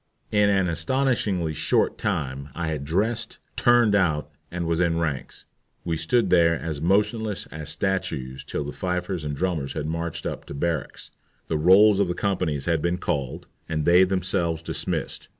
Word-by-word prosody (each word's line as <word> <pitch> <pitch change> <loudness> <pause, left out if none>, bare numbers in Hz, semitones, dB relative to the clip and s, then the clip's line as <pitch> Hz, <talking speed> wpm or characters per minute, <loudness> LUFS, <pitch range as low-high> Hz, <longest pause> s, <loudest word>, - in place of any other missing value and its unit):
In 105 -1 +4
an 95 -2 +2
astonishingly 90 -2 0
short - - +1
time 70 0 -2
I 85 -2 -2
had 75 -3 -3
dressed, 110 +8 -1 0.2
"turned 120 -3 +4
out," 80 -8 +1 0.2
and 85 0 -3
was 85 0 0
in 85 -2 +2
ranks. 75 -5 -3 0.4
We 85 -1 0
stood 80 +10 +1
there 85 -2 +4
as 75 -3 -4
motionless 105 +4 +1
as 75 -1 -6
statues 65 -11 -2
till 75 - -3
the 70 - -5
fifers 90 -1 -3
and 75 -1 -3
drummers 80 -5 -2
had - - -3
marched 85 +1 -3
up - - -4
to - - -8
barracks, 80 -1 -3 0.3
the 80 - -1
rolls 95 +5 +6
of 100 - +3
the 90 - -2
companies 85 -9 -1
had 85 -2 +1
been 85 +2 0
called, 70 -7 -3 0.2
and 80 -2 -1
they 90 +2 +6
themselves 90 -3 0
dismissed. - - -4
85 Hz, 170 wpm, -25 LUFS, 80-95 Hz, 0.4 s, rolls